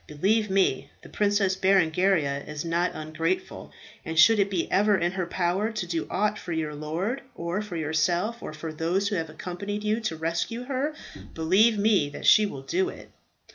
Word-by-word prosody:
"Believe 205 +8 +1
me, 185 -8 +1
the - - -12
Princess 205 -2 +1
Berengaria 180 -6 +2
is 150 +1 -5
not 170 +2 0
ungrateful, 160 +3 -3 0.3
and 160 -2 -5
should 220 +6 +7
it 200 0 +2
be 185 -4 -1
ever 205 0 +3
in 175 -1 0
her 185 -2 -3
power 185 +5 0
to 215 -4 -3
do 170 -2 -3
aught 210 +2 0
for 175 - -5
your 155 -2 -2
lord, 165 - -3
or 170 +3 -3
for 210 -4 -7
yourself, 170 +8 0
or - - -6
for 155 +1 -7
those 175 +6 0
who 210 - -2
have 165 -3 -2
accompanied 185 +6 -5
you 215 +1 +1
to 220 -8 -3
rescue 170 +9 -2
her, 275 +4 -2 0.4
believe 195 +8 +3
me 200 -8 +3
that 145 - -8
she 215 -1 +6
will 135 -8 -8
do 370 - 0
it." - - -12
185 Hz, 185 wpm, -26 LUFS, 160-210 Hz, 0.4 s, should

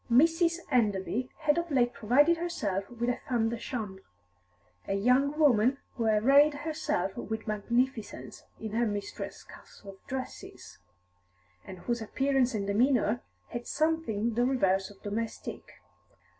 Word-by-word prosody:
Mrs. 330 +6 +4
Enderby 225 +1 +1
had 300 +1 +3
of 340 0 -4
late 245 -4 +2
provided 285 +11 +4
herself 210 - -2
with 240 0 -3
a 245 0 +1
femme 230 -3 +2
de 235 - -3
chambre, 210 -8 -5 0.9
a 195 - 0
young 255 +8 +2
woman 260 -4 +4 0.2
who 230 - -2
arrayed 275 +8 +5
herself 285 - -2
with 220 0 -5
magnificence 235 +3 -2 0.2
in 220 -1 -5
her 230 +2 +1
mistresses 205 -1 -5
castoff 195 -2 -13
dresses, 260 0 -7 0.8
and 185 - -9
whose 240 -1 -2
appearance 265 +2 +1
and 200 -2 -1
demeanour 235 +2 +2 0.3
had 240 - -6
something 295 -9 0
the 240 +2 +2
reverse 195 -7 +2
of 200 -1 -16
domestic. 220 +2 -5
240 Hz, 130 wpm, -29 LUFS, 210-275 Hz, 0.9 s, arrayed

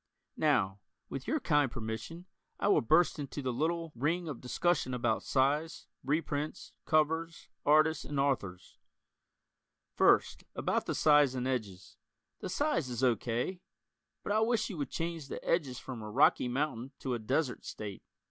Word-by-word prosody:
Now, 95 +1 +2 0.3
with 135 - -6
your 310 - +1
kind 145 - +2
permission, 115 +10 -6 0.3
I - - +1
will - - +5
burst 160 +8 +3
into 145 0 -5
the 130 -1 -1
little 165 +5 -1
(?) - - -40
ring 165 +8 0
of 150 - -6
discussion 130 0 0
about 120 -3 0
size, 145 +4 0 0.2
reprints, 150 +2 -2
covers, 160 +1 0 0.2
artists 155 +1 +4
and 145 -1 -3
authors. 100 -10 -2 1.1
First, - - +3
about - - -1
the - - -1
size 145 -3 +5
and 125 0 -2
edges: 105 -8 -4 0.4
The - - -5
size 190 - 0
is 125 +1 -3
O. 125 -3 +5
K., 125 - -3 0.6
but - - -3
I 215 - +3
wish 220 -1 +1
you 180 - -6
would 145 - -2
change 165 -3 -4
the - - -6
edges 145 -7 +1
from 125 -3 -7
a 105 - -6
"rocky 105 - +4
mountain" 130 0 -2
to 130 - -2
a 120 - -2
"desert" 130 +4 -1
state. 100 -3 -7
145 Hz, 160 wpm, -32 LUFS, 125-165 Hz, 1.1 s, will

